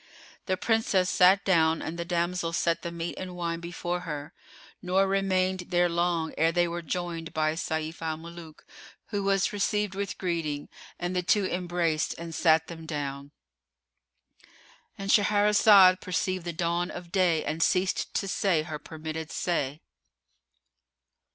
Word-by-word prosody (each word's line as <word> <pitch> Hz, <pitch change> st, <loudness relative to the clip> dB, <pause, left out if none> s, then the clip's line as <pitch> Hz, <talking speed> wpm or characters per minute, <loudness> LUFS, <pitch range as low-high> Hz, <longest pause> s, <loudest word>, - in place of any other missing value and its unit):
The 185 Hz, -1 st, 0 dB
Princess 200 Hz, -3 st, +1 dB
sat 190 Hz, +2 st, +5 dB
down 165 Hz, -4 st, +3 dB
and 160 Hz, -, -4 dB
the 170 Hz, -, -3 dB
damsel 170 Hz, -1 st, -1 dB
set 170 Hz, 0 st, +1 dB
the 170 Hz, -, -5 dB
meat 170 Hz, 0 st, -4 dB
and 185 Hz, -1 st, -6 dB
wine 170 Hz, -1 st, -3 dB
before 175 Hz, +1 st, -4 dB
her: 150 Hz, -3 st, -6 dB, 0.5 s
nor 185 Hz, +1 st, +2 dB
remained 190 Hz, -1 st, 0 dB
they 175 Hz, 0 st, +3 dB
long 170 Hz, -1 st, 0 dB
ere 165 Hz, +1 st, +4 dB
they 175 Hz, 0 st, +2 dB
were 170 Hz, +1 st, -4 dB
joined 170 Hz, -1 st, -4 dB
by 155 Hz, 0 st, +1 dB
Sayf 160 Hz, 0 st, -3 dB
al 160 Hz, -1 st, -2 dB
Muluk, 165 Hz, -1 st, -11 dB, 0.4 s
who 205 Hz, -2 st, -2 dB
was 195 Hz, 0 st, +1 dB
received 205 Hz, 0 st, 0 dB
with 200 Hz, 0 st, -4 dB
greeting 165 Hz, -5 st, -3 dB, 0.3 s
and 175 Hz, +1 st, -3 dB
the 180 Hz, -, +1 dB
two 195 Hz, +3 st, +2 dB
embraced 175 Hz, -3 st, -1 dB
and 170 Hz, 0 st, -7 dB
sat 160 Hz, -1 st, +3 dB
them 165 Hz, -1 st, -9 dB
down.——And 140 Hz, -, -9 dB
Shahrazad 205 Hz, -2 st, +6 dB
perceived 185 Hz, 0 st, -2 dB
the 170 Hz, -, -2 dB
dawn 170 Hz, +2 st, -1 dB
of 175 Hz, -1 st, -9 dB
day 175 Hz, -4 st, +2 dB
and 155 Hz, +2 st, -3 dB
ceased 185 Hz, +1 st, +1 dB
to 195 Hz, -, 0 dB
say 185 Hz, -5 st, +1 dB
her 155 Hz, -2 st, -6 dB
permitted 160 Hz, 0 st, -6 dB
say. 150 Hz, -4 st, -2 dB
175 Hz, 145 wpm, -27 LUFS, 160-185 Hz, 0.5 s, Shahrazad